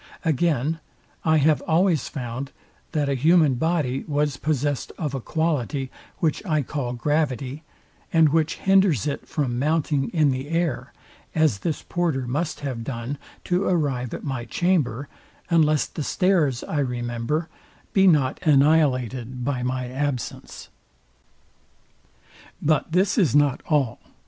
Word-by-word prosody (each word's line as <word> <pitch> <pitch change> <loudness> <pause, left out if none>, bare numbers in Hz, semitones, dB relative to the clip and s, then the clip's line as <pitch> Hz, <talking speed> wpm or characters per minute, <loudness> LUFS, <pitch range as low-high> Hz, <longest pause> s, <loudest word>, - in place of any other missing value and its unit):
Again, 160 0 +1 0.4
I 160 -1 +4
have 155 0 +3
always 165 -3 +2
found, 130 0 -5 0.4
that 150 -3 0
a 140 - +1
human 155 +2 +4
body 145 -2 0
was 145 -1 0
possest 145 -2 -1
of 150 -5 -3
a 135 - -3
quality, 145 -3 -1 0.3
which 155 -3 0
I 155 -7 0
call 125 -2 -3
gravity, 140 0 -1 0.5
and 160 -2 +5
which 160 +1 +1
hinders 190 - +3
it 145 - -3
from 125 -5 -1
mounting 150 -1 +1
in 155 -5 +2
the 130 +2 -4
air, 155 -7 -1 0.4
as 155 -10 +3
this 155 - -3
porter 160 -7 -1
must 150 +6 -2
have 130 -5 -4
done 125 +3 -5 0.2
to 180 +2 0
arrive 135 -9 0
at - - -8
my 130 -4 -3
chamber, 145 -5 0 0.4
unless 155 -3 +4
the - - -7
stairs 155 -6 +1
I 150 - -2
remember 125 +4 -2 0.5
be 195 -1 +5
not 145 -7 +3
annihilated 130 - +2
by 135 -3 -1
my 125 0 -2
absence. 135 0 -4 1.9
But 155 +1 +1
this 190 +6 +2
is 155 - +3
not 145 -2 +3
all. 140 -7 +1
145 Hz, 135 wpm, -24 LUFS, 130-160 Hz, 1.9 s, and